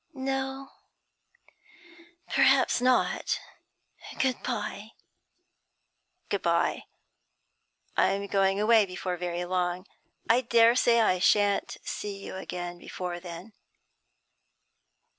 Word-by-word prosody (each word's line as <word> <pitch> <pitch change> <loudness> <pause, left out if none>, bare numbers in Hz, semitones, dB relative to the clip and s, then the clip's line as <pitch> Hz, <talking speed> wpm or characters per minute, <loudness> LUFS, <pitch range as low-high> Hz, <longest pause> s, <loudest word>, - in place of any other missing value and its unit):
'No, 270 0 -3 1.6
perhaps - - +3
not. 255 0 +1 0.8
Good 260 -1 0
bye.' 215 -2 -5 1.3
'Good - - -2
bye. - - 0 1.1
I'm 195 +1 +1
going 195 0 +1
away 215 -1 +4
before 180 0 -4
very 175 0 -3
long. 180 0 -2 0.4
I 235 +2 +4
dare 235 -1 +4
say 235 -2 +4
I 185 -4 +2
shan't 205 +2 +2
see 205 -1 -5
you 195 - -8
again 175 -2 -6
before 180 -1 -6
then.' 175 +4 -10
200 Hz, 90 wpm, -28 LUFS, 180-235 Hz, 1.6 s, away